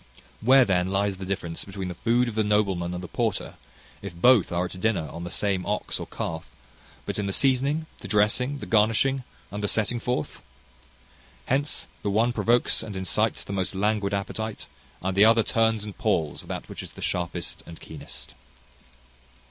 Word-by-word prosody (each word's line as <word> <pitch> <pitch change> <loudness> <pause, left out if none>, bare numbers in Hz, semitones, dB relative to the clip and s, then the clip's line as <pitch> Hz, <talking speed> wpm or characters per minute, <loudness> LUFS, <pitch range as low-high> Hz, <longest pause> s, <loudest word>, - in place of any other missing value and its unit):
Where, 130 +3 +6
then, 90 -2 +2
lies 100 0 0
the 95 -1 -6
difference 90 -4 -3
between 95 -1 -5
the 90 - -4
food 120 +7 +2
of 120 - -3
the 110 0 +1
nobleman 95 -4 +1
and 90 - -5
the - - -5
porter, - - -2 0.5
if 100 -4 -7
both 115 +2 +5
are 90 +1 0
at 90 0 -7
dinner 100 -8 +1
on 85 +1 -7
the - - -5
same 95 0 0
ox 105 +2 -2
or - - -6
calf, 80 0 -5 0.5
but - - -3
in 100 - -1
the - - -1
seasoning, 135 +7 +2
the - - -8
dressing, 105 +7 +2
the - - -7
garnishing, 115 +5 +3 0.3
and 105 +1 -4
the 105 - 0
setting 110 +3 0
forth? 125 -8 -2 1.0
Hence 140 +3 0
the 100 - -1
one 115 +4 +2
provokes 120 0 +2
and 110 -3 -7
incites 95 -2 0
the 100 - -6
most 95 0 -2
languid 105 0 +1
appetite, 105 +2 -3 0.4
and 95 0 -1
the 100 +2 +7
other 115 0 +6
turns 110 -1 +2
and 105 -3 -7
palls 80 -2 0
that - - -5
which - - -7
is - - -10
the - - -11
sharpest 90 -1 -2
and 85 - -10
keenest. - - -10
105 Hz, 185 wpm, -26 LUFS, 95-115 Hz, 1.0 s, the